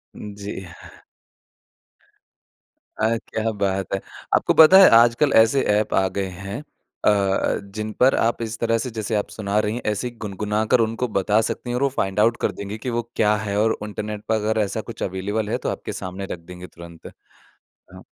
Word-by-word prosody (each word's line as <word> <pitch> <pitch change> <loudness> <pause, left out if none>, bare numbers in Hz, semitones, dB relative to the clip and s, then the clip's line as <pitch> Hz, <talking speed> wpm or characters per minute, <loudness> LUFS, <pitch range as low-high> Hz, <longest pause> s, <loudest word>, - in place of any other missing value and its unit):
जी। 100 -2 -7 2.3
अ, 110 +1 +2
क्या 110 0 -2
बात 95 -2 -2
है। 95 - 0 0.4
आपको - - +2
पता 160 +4 +8
है 195 - +9
आजकल 120 +5 +4
ऐसे 125 +5 +3 0.2
एप 105 - -1
आ 95 - +3
गए 95 -1 -1 0.2
हैं 100 +8 -5 0.4
अ - - +6
अ, 100 -2 +1 0.2
जिन 110 0 -3
पर 130 +2 +5
आप 115 +1 0
इस 115 0 -4
तरह 115 -1 +1
से 125 +3 -3
जैसे 110 0 -2
आप 105 - -1
सुना 105 -1 -3
रही 105 0 -1
हैं, 120 - -4
ऐसे 105 +3 -1
ही 120 - -9
गुनगुनाकर 105 +4 0
उनको 115 +2 0
बता 105 +3 +2
सकती 125 - -5
हैं 120 - -1
और 135 - 0
वो 140 - +3
फाइंड 95 +1 -1
आउट 115 +2 +3
कर - - +1
देंगे 100 +2 -7
कि 125 - -5
वो 120 0 -1
क्या 105 0 +3
है? 105 -1 -3
और 110 +1 +2
इंटरनेट 105 0 -5
पर 110 - +3
अगर 110 +1 0
ऐसा 100 - -3
कुछ - - -7
अवेलेबल 105 +3 -2
है - - 0
तो - - -3
आपके - - -5
सामने 95 +1 -6
रख 85 - -8
देंगे 90 +2 -11
तुरंत। 85 -1 -12 0.9
हाँ। - - -12
105 Hz, 195 wpm, -22 LUFS, 100-115 Hz, 2.3 s, है